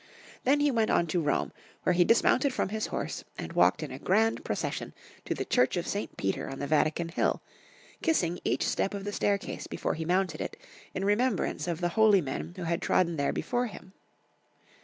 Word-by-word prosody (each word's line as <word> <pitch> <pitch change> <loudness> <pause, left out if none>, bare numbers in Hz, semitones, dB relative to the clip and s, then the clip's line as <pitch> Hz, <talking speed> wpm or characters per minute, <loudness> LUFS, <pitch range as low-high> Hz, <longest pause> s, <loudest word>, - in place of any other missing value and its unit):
Then 285 +3 +4
he 290 -1 +3
went 225 -3 +1
on 170 - +3
to 170 +1 0
Rome, 150 -2 0 0.3
where 180 - +3
he 175 0 +5
dismounted 255 +7 +4
from - - 0
his 215 +1 -2
horse - - -4
and 80 - -6
walked 90 - +4
in 145 - -5
a 130 - -7
grand 220 +7 +2
procession - - -3 0.3
to - - -1
the - - -3
Church 250 -6 +2
of 175 - -1
St. 205 - -4
Peter 95 0 -2
on 135 - -6
the 140 - -3
Vatican 155 +3 +1
hill, 165 - +1 0.6
kissing 180 - +1
each - - +1
step 200 - 0
of 200 - -5
the 205 +1 -4
staircase 200 -1 -1
before - - -2
he 160 - -4
mounted 180 -1 0
it, - - -5 0.4
in 190 - -1
remembrance 205 -2 +1
of 170 0 -2
the 175 - +1
holy 215 +1 +5
men 145 +2 -4
who 185 - -6
had 170 0 -1
trodden 170 -2 +2
there 140 -1 +1
before 245 0 -1
him. 190 -2 -11
180 Hz, 200 wpm, -29 LUFS, 165-215 Hz, 0.6 s, he